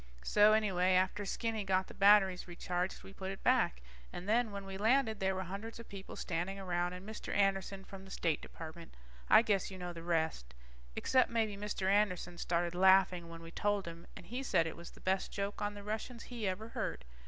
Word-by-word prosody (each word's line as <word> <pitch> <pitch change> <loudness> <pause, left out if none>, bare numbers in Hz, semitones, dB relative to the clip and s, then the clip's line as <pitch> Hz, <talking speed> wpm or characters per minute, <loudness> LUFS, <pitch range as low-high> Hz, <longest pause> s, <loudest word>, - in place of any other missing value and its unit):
So 210 +1 +6
anyway, 190 -4 +3
after 190 +3 +2
Skinny 225 -1 -2
got 190 -1 +1
the - - -12
batteries 195 -2 +5
recharged, 180 +1 -3
we 195 - -11
put 190 -1 -5
it 195 - -7
back. - - +2 0.3
And 180 - -7
then 230 +2 +3
when 200 -1 -6
we 195 0 -6
landed 220 +2 +2
there 190 0 +1
were 190 - -2
hundreds 200 +5 -6
of 230 - -10
people 195 -1 -8
standing 180 +3 -3
around, 180 -2 -1
and 180 +2 -9
Mr. 220 - -6
Anderson 195 -1 +1
from 195 -1 -10
the 195 - -13
State 165 -4 -1
Department. 165 +1 -10 0.3
I 225 - +8
guess 200 -4 +1
you 190 - -8
know 180 -1 -5
the 165 - -8
rest. 160 - -1 0.4
Except 260 -1 +3
maybe 225 -3 0
Mr. 200 -1 -3
Anderson 180 -3 +1
started 170 0 0
laughing 185 -2 +4
when 165 0 -9
we 165 - -9
told 205 0 0
him, 170 0 -9
and - - -11
he 245 +8 -4
said 185 -10 +2
it 165 - -4
was 170 0 -10
the - - -17
best 190 0 0
joke 200 +1 -3
on 205 0 -2
the 205 - -8
Russians 220 +3 -4
he 235 -4 -4
ever 210 +4 -3
heard. - - -4
190 Hz, 210 wpm, -34 LUFS, 175-210 Hz, 0.4 s, I